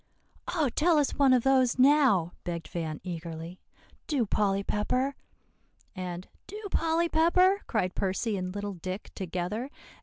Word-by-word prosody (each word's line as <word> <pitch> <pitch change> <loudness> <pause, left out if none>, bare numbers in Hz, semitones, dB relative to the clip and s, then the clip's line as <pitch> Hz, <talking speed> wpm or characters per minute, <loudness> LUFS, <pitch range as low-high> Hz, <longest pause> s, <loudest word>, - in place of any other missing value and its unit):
"Oh, 305 -6 +2
tell 320 +6 +3
us 290 -2 +2
one 275 -2 +4
of 250 -2 +4
those 260 -2 +3
now!" 260 - +4
begged 170 -2 -4
Van 160 -3 -4
eagerly, 170 0 -6 0.5
"do, 275 -7 +1
Polly 200 -1 +1
Pepper;" 250 +7 0 0.8
and 180 -1 -5 0.2
"do, 415 +3 -7
Polly 330 +1 +1
Pepper," 365 +5 +3
cried 185 -6 0
Percy 200 +3 -1
and 185 -1 -3
little 205 0 -3
Dick 185 +3 -6
together. 185 +7 -3
210 Hz, 140 wpm, -28 LUFS, 180-280 Hz, 0.8 s, one